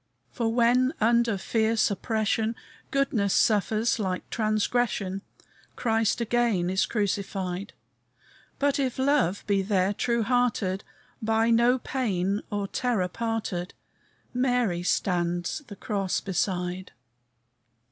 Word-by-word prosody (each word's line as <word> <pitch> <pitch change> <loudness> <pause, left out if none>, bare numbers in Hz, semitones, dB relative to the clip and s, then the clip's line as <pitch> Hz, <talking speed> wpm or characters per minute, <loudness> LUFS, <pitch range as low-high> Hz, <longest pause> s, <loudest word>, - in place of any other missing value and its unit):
"For, 230 -3 -1
when 245 +3 +3
under 235 -1 +3
fierce 220 +2 +1
oppression, 220 +2 0 0.3
Goodness 230 -8 +1
suffers 215 +2 +2
like 185 -3 -2
transgression, 215 -3 0 0.5
Christ 225 -2 +1
again 230 -6 +1
is 190 - +1
crucified; 195 -2 -2 0.8
But 285 0 +1
if 260 -3 -1
love 260 - +2
be 200 -1 +2
there 195 0 +1
true 235 +2 0
hearted, 220 -5 +1 0.4
By 225 +1 +2
no 235 +2 +4
pain 205 -7 -1
or 205 -2 -2
terror 220 -6 0
parted, 215 -4 -3 0.6
Mary 245 -8 +1
stands 175 - 0
the 205 - -9
cross 195 -2 -1
beside!" 180 -1 -2
215 Hz, 105 wpm, -27 LUFS, 190-235 Hz, 0.8 s, no